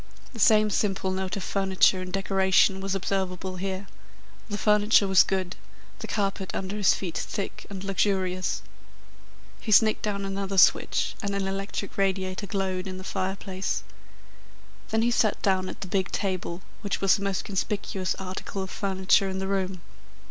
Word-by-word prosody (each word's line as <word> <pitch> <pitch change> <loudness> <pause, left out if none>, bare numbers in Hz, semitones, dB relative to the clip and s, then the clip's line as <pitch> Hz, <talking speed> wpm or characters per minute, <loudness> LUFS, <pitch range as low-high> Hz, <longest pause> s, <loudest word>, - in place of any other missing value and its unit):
The 230 - -9
same 215 0 +5
simple 195 -2 0
note 190 +1 -2
of 195 - -4
furniture 190 -1 +2
and 185 0 -6
decoration 190 0 +3
was 195 0 -1
observable 190 -1 -2
here. 190 +1 -3 0.6
The 205 - -2
furniture 210 0 +4
was 190 -1 +7
good, 190 -1 -1 0.4
the - - -6
carpet 195 -2 -2
under 195 +1 -3
his 205 -2 +4
feet 175 -4 -5
thick 200 - -4
and 195 -1 -6
luxurious. 190 -2 0 1.0
He 220 - -4
snicked 215 +1 +5
down 200 -2 -2
another 195 0 -3
switch - - +4
and 200 -2 -2
an 195 -1 -1
electric 195 +1 -4
radiator 190 0 0
glowed 190 -1 -2
in 185 -1 -5
the 185 - -8
fireplace. 190 0 -3 1.1
Then 220 0 +1
he 240 - +2
sat 220 -3 +2
down 185 -1 +2
at - - -9
the 195 - -5
big 190 0 -1
table, 185 -2 -3 0.2
which 200 -2 -2
was 195 -1 +4
the 200 - -5
most 195 -2 -1
conspicuous 195 -1 -2
article 190 +1 -5
of 190 - -8
furniture 190 -1 +2
in 190 - -3
the 190 0 -2
room. 190 -2 -2
195 Hz, 165 wpm, -26 LUFS, 190-200 Hz, 1.1 s, was